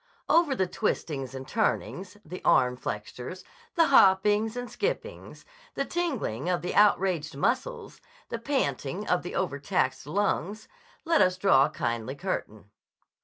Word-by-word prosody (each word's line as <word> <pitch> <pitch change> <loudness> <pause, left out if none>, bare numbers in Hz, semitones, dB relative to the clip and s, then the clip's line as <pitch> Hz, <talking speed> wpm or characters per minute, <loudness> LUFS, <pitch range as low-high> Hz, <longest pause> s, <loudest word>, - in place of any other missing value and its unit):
Over 325 -5 +4
the 190 - +1
twistings 135 -6 -3
and 130 0 -7
turnings, 200 -3 -2
the 180 +4 -8
arm 125 -1 +4
flexures, 125 - -6 0.3
the 335 -2 +5
hoppings 210 0 +4
and 245 0 -4
skippings, 445 - -4 0.3
the 275 - -1
tingling 265 - -2
of 180 -1 0
the 180 - -2
outraged 180 -7 +2
muscles, 260 - -2 0.3
the 230 - -4
panting 270 +3 -2
of - - +2
the - - -7
overtaxed - - -1
lungs, 205 0 -1 0.4
let 330 -1 +3
us 185 0 +3
draw 160 -9 +5
a - - -2
kindly 120 -2 -3
curtain. 110 - -5
185 Hz, 135 wpm, -27 LUFS, 135-230 Hz, 0.4 s, the